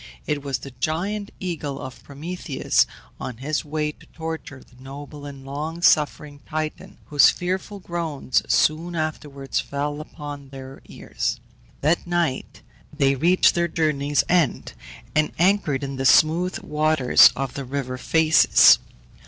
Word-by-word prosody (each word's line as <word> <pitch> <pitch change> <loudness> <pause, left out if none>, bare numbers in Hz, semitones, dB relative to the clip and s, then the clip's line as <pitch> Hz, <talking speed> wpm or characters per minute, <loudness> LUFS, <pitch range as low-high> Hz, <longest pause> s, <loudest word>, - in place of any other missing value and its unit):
It 145 -1 -1
was 140 -2 -2
the 140 - -10
giant 175 - -3
eagle 150 -6 -4
of 130 -1 -9
Prometheus 150 0 -1 0.3
on 125 - -6
his 145 +5 -2
way 150 0 -2
to - - -21
torture 160 -5 -7
the 125 0 -21
noble 145 +2 -9
and 135 -1 -10
long 155 +5 -5
suffering 150 -2 +2
Titan, 155 0 -5
whose 145 -1 +6
fearful 190 +3 -3
groans 165 -7 -1
soon 165 +3 +2
afterwards 150 -4 -3
fell 145 +1 -3
upon 145 -3 -9
their 135 0 -10
ears. - - -4 0.4
That 160 +5 +1
night 170 -6 -2 0.3
they 140 -3 +2
reached 175 +7 +4
their 170 0 +1
journey's 150 -3 0
end, 175 -5 +1 0.4
and 155 0 +2
anchored 175 -6 +2
in 135 -1 -4
the 135 - -2
smooth 170 +6 +4
waters 150 -3 +5
of 135 -2 -3
the 140 - -5
river 130 -1 -4
Phases. 160 +3 +5
150 Hz, 135 wpm, -23 LUFS, 140-165 Hz, 0.4 s, whose